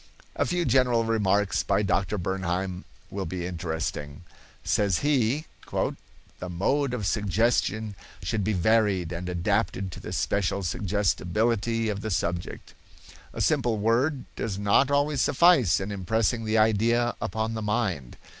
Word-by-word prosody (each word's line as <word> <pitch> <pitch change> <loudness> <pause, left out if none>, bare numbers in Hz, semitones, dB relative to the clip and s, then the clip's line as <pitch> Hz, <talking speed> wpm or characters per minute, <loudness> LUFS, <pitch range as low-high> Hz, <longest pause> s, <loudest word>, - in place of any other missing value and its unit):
A - - 0
few 175 -1 0
general 125 -2 +3
remarks 100 -5 +1
by 105 - +1
Dr. 100 +1 0
Bernheim 95 0 -2 0.3
will 95 -2 -4
be 90 +1 -4
interesting. 80 -3 -4 0.4
Says 100 -4 +1
he: 140 +1 +2 0.3
"The 90 - -5
mode 125 +10 0
of 110 -5 -4
suggestion 110 +1 0 0.3
should 105 -3 -1
be 110 +3 0
varied 100 -3 +2
and 90 +1 -4
adapted 90 +2 -1
to - - -8
the - - -8
special 100 0 0
suggestibility 105 +5 0
of 100 -1 -3
the 110 - -3
subject. 85 -2 -3 0.6
A - - -5
simple 115 -3 +1
word 125 +6 +1
does 100 -4 -3
not 100 +7 +3
always 145 -1 +1
suffice 145 - +4
in 95 +1 -4
impressing 110 +4 0
the 110 +1 +1
idea 115 +3 +3
upon 110 0 -2
the 110 - -4
mind. 105 - -2
105 Hz, 135 wpm, -26 LUFS, 95-115 Hz, 0.6 s, suffice